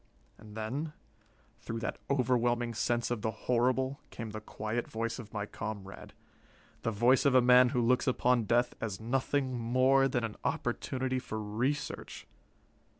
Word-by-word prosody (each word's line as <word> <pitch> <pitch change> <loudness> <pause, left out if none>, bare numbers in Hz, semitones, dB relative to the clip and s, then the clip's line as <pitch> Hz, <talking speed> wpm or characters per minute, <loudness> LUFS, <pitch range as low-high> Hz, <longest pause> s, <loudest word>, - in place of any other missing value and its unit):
And 105 0 -12
then, 135 +8 -3 0.7
through 115 - -5
that - - -3
overwhelming 120 -3 +1
sense 120 +2 0
of 120 -3 -1
the 110 - 0
horrible, 125 +4 0
came 115 -2 -6
the 110 0 -6
quiet 110 +2 -3
voice 115 +2 -3
of 110 -3 -9
my 105 -1 -3
comrade 100 -2 -7 0.7
the - - 0
voice 120 +4 +4
of 140 -3 +3
a - - +9
man 125 0 +7
who 125 - 0
looks 125 +1 +2
upon 125 -2 +2
death 120 +3 +2
as 105 -4 -3
nothing 130 +3 0
more 130 +3 +4
than 120 -2 -1
an 110 -2 -4
opportunity 130 0 -1
for 110 -3 -5
research. 115 +7 -3
120 Hz, 150 wpm, -31 LUFS, 110-130 Hz, 0.7 s, a